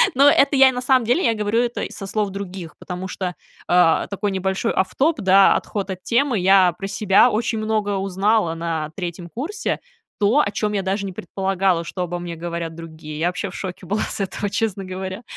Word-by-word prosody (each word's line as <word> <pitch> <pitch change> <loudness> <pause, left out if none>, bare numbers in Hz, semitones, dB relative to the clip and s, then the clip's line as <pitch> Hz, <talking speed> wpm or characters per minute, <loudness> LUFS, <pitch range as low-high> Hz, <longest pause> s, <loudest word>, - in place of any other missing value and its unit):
Но 280 +3 +6
это 280 0 +4
я, 265 -1 +7
на 250 -1 -4
самом 255 -2 +3
деле, 245 +11 +2
я 230 - +3
говорю 210 +1 0
это 240 0 -2
й - - -5
со 195 - -7
слов 205 0 -1
других, 190 -4 -7
потому 180 +1 -6
что, 180 -2 -4 0.3
э, 175 -2 +4
такой 200 0 -2
небольшой 190 +4 -1
off 190 - +1
top, 310 +4 +3
да, 195 -1 +5
отход 200 -2 -3
от 185 -1 -7
темы. 250 0 +1
Я 185 -1 +5
про 195 - -4
себя 200 +3 +4
очень 225 +1 -1
много 215 -2 -1
узнала 195 -1 +1
на 165 -2 -3
3 175 -1 -6
курсе 335 - -3 0.4
то, 215 +7 +3
о 250 - +2
чем 210 0 -1
я 200 - 0
даже 195 +1 -1
не 195 - -4
предполагала, 190 -1 0
что 180 +2 -6
обо 175 0 -4
мне 175 -1 -6
говорят 170 0 -5
другие. 160 -2 -9
Я 165 - +1
вообще 180 +2 -3
в 185 - -11
шоке 185 -1 -6
была 205 +5 -1
с - - -3
этого, 200 +1 -3
честно 200 -2 -2
говоря. 190 +3 -6
195 Hz, 210 wpm, -21 LUFS, 180-215 Hz, 0.4 s, я